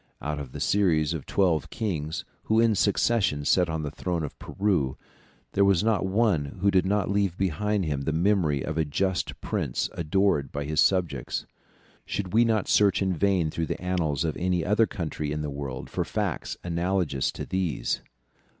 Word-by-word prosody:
Out 75 0 -3
of 65 -3 -8
a - - -4
series 85 -6 +2
of 80 -4 -6
twelve 90 -6 +1
kings, 80 -8 -3 0.2
who 110 +1 +3
in 115 -1 +4
succession 100 -6 +1
sat 90 +1 +3
on 80 -1 -2
the 75 - -3
throne 85 +1 -2
of 75 - -6
Peru, 90 -10 0 0.5
there 100 - +3
was 100 -2 +4
not 110 -3 +1
one 95 -6 +2 0.2
who 100 0 +4
did 95 -1 +3
not 100 -1 +1
leave 100 -3 +1
behind 95 +2 0
him 70 -3 -1
the 80 - -1
memory 80 -4 +2
of 80 0 -2
a - - +3
just 95 +5 -1
prince - - -2
adored 85 -3 +1
by 70 - -3
his 75 +1 +2
subjects. 85 -9 0 0.6
Should 95 -3 -4
we 115 +2 +6
not 110 -3 +1
search 100 -1 +4
in 95 -1 +1
vain 90 -2 +1
through 80 0 -2
the - - -3
annals 85 -5 0
of 80 - -1
any 90 -2 0
other 105 +3 +3
country 75 -3 -4
in 75 0 -2
the 75 - -3
world 70 -2 -5
for - - -2
facts - - -3
analogous 85 -4 0
to - - -5
these? 85 -13 -1
90 Hz, 185 wpm, -26 LUFS, 75-100 Hz, 0.6 s, we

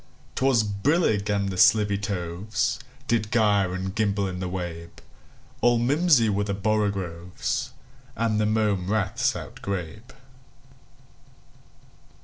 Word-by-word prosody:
'T - - -3
was 130 -4 +4
brillig, 105 - +1
and 100 -1 0
the 95 - -5
slithy 105 +1 +5
tovesDid 100 +3 -2
gyre 100 -5 +2
and 95 +1 -4
gimble 100 -2 0
in 90 -1 -5
the 90 -1 -3
wabe; 85 -2 -6 0.6
All 120 0 +4
mimsy 140 0 +3
were 100 -1 +1
the 100 -1 -2
borogoves, 100 -4 -2 0.5
And 110 -2 0
the 105 - +2
mome 105 -4 0
raths 105 -3 +1
outgrabe. 100 +4 -6
100 Hz, 115 wpm, -25 LUFS, 95-110 Hz, 0.6 s, slithy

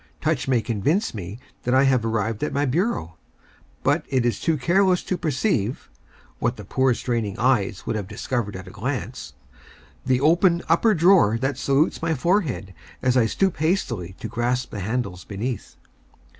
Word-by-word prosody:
Touch 150 -5 0
may 125 -3 +2
convince 145 - 0
me 100 -1 -6 0.2
that 125 +1 +1
I 135 - +5
have 130 -4 +3
arrived 110 0 -1
at 150 - -1
my 145 +1 +1
bureau, 135 - -1 0.7
but - - +2
it 130 -3 +1
is 120 - 0
too 160 -2 +1
careless 180 +5 +2
to 185 - -1
perceive 135 - -1 0.5
(what - - 0
the - - -8
poor, 130 -2 +2
straining 115 -6 -2
eyes 110 -6 +1
would - - -2
have 105 -3 -3
discovered 115 -2 -3
at 95 0 -8
a - - -9
glance) 120 +1 -4 0.7
the 130 -1 +2
open 170 +4 +3
upper 205 +7 +4
drawer 165 - +5
that 135 +2 -2
salutes 140 +4 +1
my 165 -1 0
forehead 130 - 0 0.3
as 125 0 +2
I 120 -3 +4
stoop 190 - 0
hastily 130 - -1
to - - -5
grasp 125 +1 -1
the 105 - -5
handles 100 -3 -3
beneath. 115 +5 -5
125 Hz, 170 wpm, -23 LUFS, 110-155 Hz, 0.7 s, I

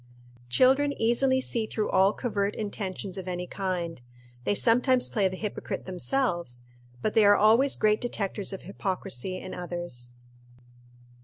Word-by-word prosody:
Children 270 - +3
easily 260 +3 +3
see 230 -3 0
through 215 -1 -2
all 190 +1 +5
covert 210 -4 -2
intentions 195 -2 -4
of 185 - -8
any 180 0 -3
kind. 180 -6 -3 0.4
They 205 - +2
sometimes 250 +3 +3
play 205 -4 +2
the 185 0 -5
hypocrite 210 0 -4
themselves, 175 - -2 0.4
but 215 - 0
they 220 - +5
are 205 0 +7
always 230 +6 +4
great 215 0 +2
detectors 205 -4 -2
of 195 - -7
hypocrisy 185 - -3
in 185 - -7
others. 175 -9 -6
200 Hz, 140 wpm, -27 LUFS, 180-230 Hz, 0.4 s, are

